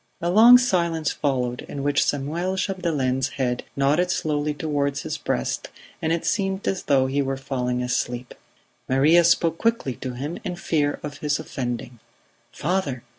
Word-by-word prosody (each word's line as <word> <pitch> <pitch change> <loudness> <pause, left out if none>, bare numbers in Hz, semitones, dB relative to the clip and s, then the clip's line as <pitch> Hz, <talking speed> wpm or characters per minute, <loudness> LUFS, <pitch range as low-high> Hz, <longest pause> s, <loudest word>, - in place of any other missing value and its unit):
A 170 +1 -1
long 230 +5 +9
silence 170 - +1
followed, 125 -4 -1
in 140 - -5
which 145 0 +2
Samuel 165 +7 -1
Chapdelaine's 150 -10 0
head 125 -2 -1
nodded 150 +6 +2
slowly 150 -3 0
towards 140 -2 -1
his - - -4
breast - - -2 0.3
and 160 - 0
it 165 0 -1
seemed 195 -1 -1
as 190 - 0
though 135 -2 +3
he 135 +2 0
were 135 -1 -2
falling 125 -2 -2
asleep. 125 0 -2 0.6
Maria 150 +7 +5
spoke 165 -1 +2
quickly 230 - 0
to 130 -1 -5
him, 145 +7 -5
in 180 - -3
fear 155 -5 0
of 145 -1 -6
his 150 0 0
offending: 120 -2 -5 0.5
"Father! 150 -7 -2
145 Hz, 155 wpm, -24 LUFS, 135-170 Hz, 0.6 s, long